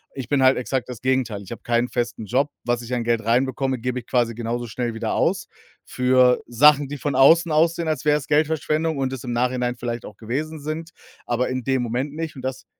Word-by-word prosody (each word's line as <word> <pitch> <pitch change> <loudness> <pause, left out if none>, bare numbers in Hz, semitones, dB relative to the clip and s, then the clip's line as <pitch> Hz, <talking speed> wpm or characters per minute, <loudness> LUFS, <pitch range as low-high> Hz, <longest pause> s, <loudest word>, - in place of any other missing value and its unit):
Ich 130 -3 -6
bin 140 -2 +2
halt 130 +1 +5
exakt 130 0 -2
das 125 -3 -7
Gegenteil. 125 -6 0
Ich 95 - -13
habe 120 - -7
keinen 120 +1 +1
festen 120 -2 -3
Job. 130 +7 +1
Was 120 0 0
ich 120 +1 -9
an 120 -1 0
Geld 115 -1 0
reinbekomme, 130 +3 +1
gebe 125 +2 -2
ich 120 - -14
quasi 120 -2 +1
genauso 120 +1 -3
schnell 115 +1 -3
wieder 115 -1 -2
aus - - 0 0.4
für 125 0 +3
Sachen, 145 +4 +5
die 145 +2 -6
von 145 +1 -2
außen 165 +5 +6
aussehen, 165 +2 +2
als 155 -4 -1
wär's 150 -2 +2
Geldverschwendung 155 +1 +1
und 135 -1 -1
es 130 - -6
im 120 -2 -4
Nachhinein 125 0 0
vielleicht 120 -1 -5
auch 105 - -11
gewesen 150 +8 -4
sind, 155 +3 -5 0.4
aber 120 +1 0
in 130 0 -3
dem 130 -1 0
Moment 125 +5 -3
nicht 160 -1 -4
und - - -7
das 130 -1 -4
130 Hz, 220 wpm, -23 LUFS, 120-145 Hz, 0.4 s, außen